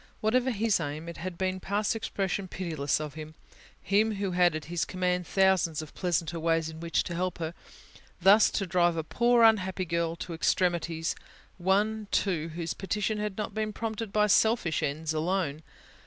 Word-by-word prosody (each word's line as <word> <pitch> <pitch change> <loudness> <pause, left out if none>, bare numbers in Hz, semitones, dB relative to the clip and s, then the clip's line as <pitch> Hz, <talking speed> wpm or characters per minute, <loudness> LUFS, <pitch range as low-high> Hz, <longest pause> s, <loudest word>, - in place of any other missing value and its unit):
Whatever 250 +4 +2
His 220 -3 +1
aim, 155 +1 -4
it 170 - -7
had 180 0 -6
been 185 0 -1
past 205 +4 -1
expression 195 -3 -2
pitiless 160 -7 -2
of 150 -2 -5
Him, 155 0 -9 0.5
Him 215 +2 +2
who 195 -1 -2
had 175 -2 +3
at 155 - -5
His 170 +1 -2
command 180 -1 -1
thousands 190 -5 +2
of 155 - -12
pleasanter 170 -2 -1
ways 165 0 +1
in 160 0 -9
which 170 0 0
to 175 - -5
help 180 +1 -2
her, 165 -1 -4 0.7
thus 195 +4 +6
to 195 - -1
drive 175 -2 +2
a 160 - -1
poor 235 +7 +3
unhappy 190 -4 +3
girl 170 -1 -1
to 170 - -6
extremities: 165 -1 0 0.5
one, 205 +4 +1
too, 170 -5 0
whose 170 -1 -3
petition 210 +2 -2
had 210 -2 -3
not 210 -1 -3
been 215 0 -2
prompted 225 -1 -4
by 210 0 +3
selfish 210 -5 +3
ends 155 +1 -2
alone. 160 -2 -1
180 Hz, 175 wpm, -28 LUFS, 165-205 Hz, 0.7 s, thus